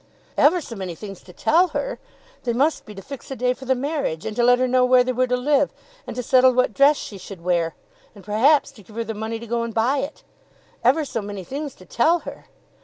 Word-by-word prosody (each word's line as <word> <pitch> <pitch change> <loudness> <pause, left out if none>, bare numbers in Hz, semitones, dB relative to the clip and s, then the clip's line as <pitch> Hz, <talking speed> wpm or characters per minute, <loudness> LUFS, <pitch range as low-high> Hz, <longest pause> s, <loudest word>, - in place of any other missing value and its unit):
Ever 345 +4 +4
so 235 - -8
many 185 -4 -5
things 195 0 -9
to 180 - -14
tell 340 - +3
her! - - -3 0.4
They 240 - 0
must 285 +7 +1
be 210 - -10
to 195 - -9
fix 275 -3 -9
a 270 - -4
day 250 +1 +1
for 265 - -12
the 260 0 +2
marriage, 275 - -2
and 215 - -4
to 240 - +1
let 245 +1 +6
her 255 0 +1
know 255 0 +3
where 250 0 +5
they 255 - -1
were 255 +1 +1
to 250 0 +1
live, 285 +2 +2 0.4
and - - -6
to 250 - -3
settle 255 +1 +5
what 250 -3 +2
dress 280 +4 +5
she 200 - -7
should 185 -2 -10
wear, 170 -2 0 0.4
and 200 - -13
perhaps 255 +9 +3
to 215 - -16
give 210 +2 -17
her 230 - -1
the 225 0 -5
money 220 +2 -4
to 230 - -9
go 235 +1 -1
and 230 -1 -4
buy 250 +5 +2
it! 280 +3 -5 0.6
Ever 280 +6 +3
so 230 - -3
many 200 -2 -6
things 280 - -5
to 185 - -16
tell 320 - +2
her! - - -10
245 Hz, 255 wpm, -22 LUFS, 215-275 Hz, 0.6 s, let